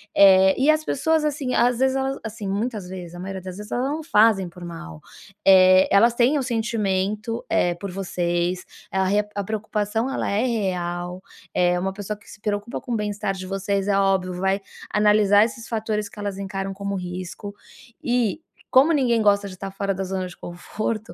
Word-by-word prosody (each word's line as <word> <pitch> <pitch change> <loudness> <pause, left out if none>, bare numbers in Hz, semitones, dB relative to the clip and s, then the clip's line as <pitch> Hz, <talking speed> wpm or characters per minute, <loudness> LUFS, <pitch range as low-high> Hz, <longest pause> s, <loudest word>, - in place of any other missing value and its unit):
Eh, 190 -1 +7
e 275 +4 +5
as 310 0 0
pessoas, 320 +3 +1
assim, 280 -4 -2
às 245 0 +3
vezes, 265 0 +2
elas 270 0 -1
assim 215 -2 -6
muitas 205 -1 -3
vezes, 180 -2 -8
a - - -8
maioria 190 +1 -5
das 185 -1 -7
vezes, 210 +1 -9
elas 250 - 0
não 300 +4 -2
fazem 210 - +3
por 175 +1 -11
mal, 80 - -8 0.5
eh, 185 0 +7
elas 230 +4 +5
têm 255 +5 +3
o - - -1
sentimento, 220 -2 -1
eh, 175 -1 +2
por 195 +2 -6
vocês, 175 -1 -2 0.3
a 190 0 +1
re 205 +2 +2
a 200 - -1
preocupação 220 +3 -2
ela - - -2
é 205 +3 +1
real, 180 -5 -2 0.3
eh, 180 0 +2
uma 190 +1 -2
pessoa 205 +1 -5
que 200 - -23
se 210 - -13
preocupa 210 +3 -3
com 245 - -5
o - - +1
bem-estar 210 -2 -2
de 185 0 -7
vocês, 195 +1 -1
é 200 - +2
óbvio 190 -2 +1
vai 190 +2 0 0.3
analisar 210 -1 +5
esses 230 0 -7
fatores 215 -2 -2
que - - -18
elas 200 -1 -4
encaram 195 0 -4
como 200 +1 -4
risco, 185 +2 -6 0.5
e 245 +3 0 0.3
como 275 +5 +6
ninguém 250 -6 +2
gosta 205 -1 +3
de 185 - -11
tá 195 +1 -6
fora 195 0 -2
da 190 - -3
zona 185 0 -3
de 180 - -12
conforto, 215 +5 -5
200 Hz, 195 wpm, -23 LUFS, 185-225 Hz, 0.5 s, Eh